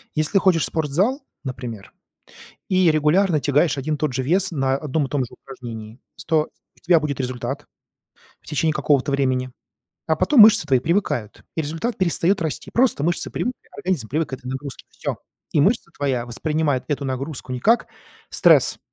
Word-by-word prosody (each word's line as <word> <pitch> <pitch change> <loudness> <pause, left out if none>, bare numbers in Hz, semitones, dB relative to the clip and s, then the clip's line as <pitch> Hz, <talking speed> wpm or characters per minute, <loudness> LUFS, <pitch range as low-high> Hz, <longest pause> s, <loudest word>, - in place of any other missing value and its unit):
Если 155 +6 +1
ходишь 185 -4 +3
в - - +1
спортзал, 175 - 0 0.2
например, 120 -6 -7 0.8
и 185 -3 +4
регулярно 155 +2 +3
тягаешь 145 +1 +2
один 150 +3 -1
и - - -2
тот 150 -1 -1
же 130 +1 -1
вес 180 +8 +1
на 135 -5 0
одном 145 0 -1
и - - -11
том 140 +1 -1
же 120 - -12
упражнении, 115 -3 -9 0.2
с - - -6
то 160 -2 +1 0.3
у - - -24
тебя 170 -1 +4
будет 150 -3 -3
результат 130 +2 -4 0.8
в - - -27
течение 155 +1 +1
какого-то 140 -1 +1
времени. 130 -2 0 0.6
А 160 - +2
потом 185 - +4
мышцы 215 -5 +8
твои 135 -3 +4
привыкают, 145 - -1
и - - -1
результат 165 +11 -3
перестаёт 185 +1 +2
расти. 160 -5 -3
Просто 235 - +2
мышцы 170 +1 0
привыкли, 250 +1 -3 0.2
организм 180 - -2
привык 155 +6 -1
к - - -20
этой 130 -1 -7
нагрузке. 135 +1 -6
Всё. - - -4 0.4
И 150 - +3
мышца 200 +3 +2
твоя 130 -4 -1
воспринимает 145 +2 -1
эту 145 -2 -2
нагрузку 130 0 -4
не 125 - -3
как 230 - +3 0.4
стресс, - - +4
150 Hz, 180 wpm, -22 LUFS, 130-170 Hz, 0.8 s, мышцы